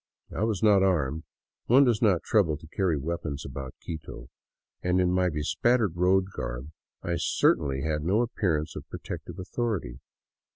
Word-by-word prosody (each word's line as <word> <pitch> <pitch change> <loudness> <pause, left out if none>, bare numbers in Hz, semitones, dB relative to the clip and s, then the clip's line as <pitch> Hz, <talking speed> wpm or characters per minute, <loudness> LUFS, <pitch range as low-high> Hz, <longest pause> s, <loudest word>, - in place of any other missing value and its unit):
I - - -1
was 110 -4 -1
not 105 -3 +6
armed 80 -5 +1 0.2
— - - -67
one 130 +4 +7
does 120 -5 +2
not 100 -6 +3
trouble 85 -8 +2
to 80 - -14
carry 90 -6 +1
weapons 75 -1 -4
about 65 -1 -7
Quito 70 -6 -7 0.3
— - - -59
and 90 +1 +1
in 90 -1 +2
my 90 0 +2
bespattered 95 +6 +1
road 95 +2 +2
garb 60 +5 -5 0.3
I 85 - -3
had 85 -1 -1
certainly 70 -3 +2 0.2
no 95 +9 +2
appearance 90 -10 -1
of - - -8
protective 85 - -7
authority. 100 - -3
90 Hz, 165 wpm, -27 LUFS, 75-100 Hz, 0.3 s, one